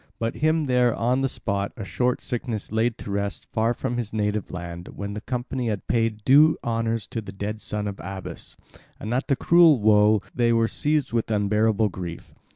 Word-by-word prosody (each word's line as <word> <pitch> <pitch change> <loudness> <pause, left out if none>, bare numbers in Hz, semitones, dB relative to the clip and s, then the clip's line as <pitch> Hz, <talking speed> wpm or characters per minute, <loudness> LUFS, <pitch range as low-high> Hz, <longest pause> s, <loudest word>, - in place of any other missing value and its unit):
But 115 0 -2
him 155 0 +2
there 125 -3 +3
on 125 +3 +1
the 135 - +1
spot 100 -4 -3
a 110 - -5
short 125 +5 0
sickness 115 -5 -4
laid 110 +1 +1
to 100 - -7
rest 100 0 -3
far 115 +1 +1
from 120 +1 -3
his 115 -3 -4
native 105 -1 -1
land, 85 -1 -7
when 100 0 -5
the 105 - -5
company 125 +1 -3
had 105 -3 -3
paid 115 -2 0
due 150 +4 +6
honours 115 -1 -1
to 115 -3 -3
the 105 - -9
dead 105 +2 -5
son 105 -1 -3
of 100 -1 -5
Abas. 95 +1 -7 0.4
And 110 +2 -4
at 130 - -1
the 140 - +3
cruel 165 0 +5
woe 105 0 +4
they 120 -1 +2
were 115 -1 +3
seized 145 0 -1
with 115 -1 0
unbearable 105 +1 +2
grief. 85 -3 -7
110 Hz, 195 wpm, -24 LUFS, 105-125 Hz, 0.4 s, due